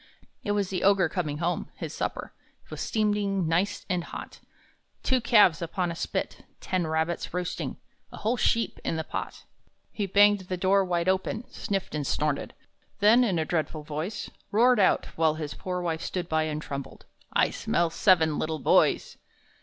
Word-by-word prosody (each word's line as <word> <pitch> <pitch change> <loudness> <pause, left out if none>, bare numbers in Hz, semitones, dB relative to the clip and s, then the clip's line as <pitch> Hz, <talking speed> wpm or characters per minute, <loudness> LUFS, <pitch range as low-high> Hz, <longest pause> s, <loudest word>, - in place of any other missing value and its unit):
It 205 -4 0
was 200 -2 -1
the 185 - -1
Ogre 195 -3 +4
coming 155 -5 -2
home; 170 +2 -2
his - - -6
supper - - -4 0.4
Was - - -5
steaming 205 -4 0
nice 180 +5 0
and 180 -3 -1
hot, - - -8 0.6
Two 260 -2 +2
calves 210 - +5
upon 170 +1 -2
a - - -5
spit, - - -3 0.2
ten 180 -3 -1
rabbits 160 +2 -1
roasting, 180 -1 -3 0.3
A - - -9
whole 225 +3 0
sheep 230 -2 +1
in - - -1
the 160 - -2
pot. - - -6 0.5
He 205 -2 -2
banged 205 +2 +5
the 185 - -1
door 195 +2 +3
wide 175 -1 -1
open, 190 +5 0
sniffed 195 -2 -3
and 150 -3 -2
snorted, 150 -2 -1 0.4
Then, 220 +5 +6
in 195 -8 +1
a 160 - 0
dreadful 155 -2 -2
voice, 155 +8 -5 0.2
Roared 240 +3 +4
out, 190 - +3
while 160 -1 +3
his 150 -2 -5
poor 180 -1 -4
wife 165 -2 -2
stood 180 -2 -3
by 160 -1 +1
and 155 -1 -3
trembled, 140 -1 -7 0.3
"I - - +3
smell 170 -1 0
seven 160 -5 +3
little 155 0 -1
boys!" - - +2
180 Hz, 170 wpm, -27 LUFS, 160-200 Hz, 0.6 s, Then